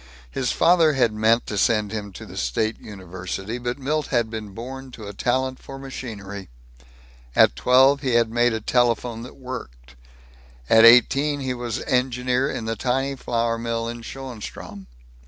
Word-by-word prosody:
His 125 Hz, -2 st, -1 dB
father 165 Hz, -3 st, +4 dB
had 120 Hz, -5 st, +2 dB
meant 110 Hz, +2 st, +2 dB
to 105 Hz, -, -3 dB
send 105 Hz, -2 st, +2 dB
him 105 Hz, -2 st, -5 dB
to -, -, -9 dB
the -, -, -11 dB
state 65 Hz, -, -1 dB
university. 95 Hz, +3 st, -6 dB
But 120 Hz, +1 st, -3 dB
Milt 150 Hz, +2 st, -1 dB
had 120 Hz, -4 st, 0 dB
been 110 Hz, -2 st, -5 dB
born 130 Hz, +3 st, -7 dB
to 110 Hz, -, -9 dB
a 100 Hz, -, -7 dB
talent 130 Hz, +4 st, -1 dB
for 135 Hz, -, -10 dB
machinery. 100 Hz, -8 st, -8 dB, 0.9 s
At -, -, +5 dB
twelve 130 Hz, -, +4 dB
he 130 Hz, -4 st, 0 dB
had 115 Hz, -1 st, +3 dB
made 120 Hz, 0 st, +2 dB
a 110 Hz, -, -3 dB
telephone 120 Hz, 0 st, +1 dB
that 125 Hz, -, -10 dB
worked. 65 Hz, -, -9 dB, 0.8 s
At 115 Hz, 0 st, +8 dB
eighteen 140 Hz, +5 st, +5 dB
he 130 Hz, -1 st, -2 dB
was 120 Hz, -1 st, -4 dB
engineer 125 Hz, 0 st, 0 dB
in 115 Hz, -, -4 dB
the 115 Hz, 0 st, -2 dB
tiny 135 Hz, +4 st, -1 dB
flour 115 Hz, -2 st, -1 dB
mill 115 Hz, 0 st, -2 dB
in 120 Hz, 0 st, -6 dB
Schoenstrom. 115 Hz, -5 st, -8 dB
120 Hz, 165 wpm, -23 LUFS, 110-130 Hz, 0.9 s, At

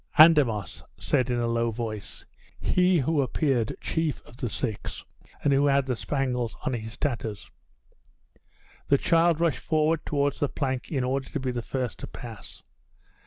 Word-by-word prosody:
"Andamos," 145 Hz, -, +5 dB, 0.2 s
said, 130 Hz, 0 st, +1 dB
in 120 Hz, -, +1 dB
a 120 Hz, -, 0 dB
low 115 Hz, 0 st, +1 dB
voice, 110 Hz, -4 st, -5 dB, 0.3 s
he 180 Hz, 0 st, +3 dB
who 150 Hz, +1 st, +2 dB
appeared 130 Hz, -3 st, 0 dB
chief 160 Hz, -3 st, -1 dB
of -, -, -15 dB
the 120 Hz, -, -2 dB
six, 105 Hz, +1 st, -4 dB, 0.4 s
and 140 Hz, -, +4 dB
who 140 Hz, +1 st, +4 dB
had 140 Hz, -1 st, +3 dB
the 130 Hz, -2 st, -1 dB
spangles 125 Hz, -3 st, -1 dB
on -, -, 0 dB
his 110 Hz, -1 st, -5 dB
tatters. 115 Hz, -7 st, -3 dB, 1.4 s
The 140 Hz, -, +5 dB
child 165 Hz, 0 st, +3 dB
rushed 170 Hz, -3 st, 0 dB
towards 155 Hz, -2 st, +1 dB
the 145 Hz, -, +1 dB
plank 130 Hz, -3 st, -3 dB
in 135 Hz, -5 st, 0 dB
order 130 Hz, +1 st, -1 dB
to 150 Hz, -, -3 dB
be 130 Hz, -1 st, -1 dB
the 120 Hz, -1 st, -3 dB
first 125 Hz, +1 st, -3 dB
to -, -, -6 dB
pass. 115 Hz, -5 st, -9 dB
130 Hz, 160 wpm, -27 LUFS, 120-150 Hz, 1.4 s, Andamos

